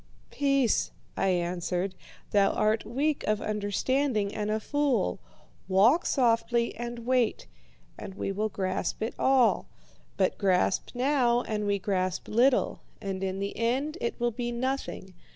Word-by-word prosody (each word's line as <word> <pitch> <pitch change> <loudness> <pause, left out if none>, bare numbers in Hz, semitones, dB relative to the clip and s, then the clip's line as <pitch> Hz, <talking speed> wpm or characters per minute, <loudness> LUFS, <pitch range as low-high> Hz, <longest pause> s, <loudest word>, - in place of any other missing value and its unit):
"'Peace!' 275 -5 +2 0.3
I - - 0
answered, 180 +1 -1 0.4
'thou 200 -1 +4
art 215 +1 +1
weak 285 +6 -1
of 215 0 +1
understanding 215 +2 0
and 210 0 -2
a 215 +1 0
fool. 265 - 0 0.5
Walk 225 - +4
softly 235 -2 +2
and 240 -1 -6
wait, 255 - +1 0.5
and 195 -2 -8
we 195 - -2
will 210 +2 -1
grasp 190 +1 -2
it 225 - -2
all. 260 -3 +3 0.5
But 190 -2 +1
grasp 190 +1 +1
now, 245 -2 +2
and 210 -1 -2
we 200 0 +2
grasp 185 -2 -1
little, 245 +4 +2 0.2
and 195 -2 -4
in 190 0 -2
the 200 +1 -3
end 270 +8 -1
it 235 - -2
will 240 0 +1
be 240 +1 -3
nothing. 250 -6 -3
220 Hz, 140 wpm, -28 LUFS, 195-255 Hz, 0.5 s, thou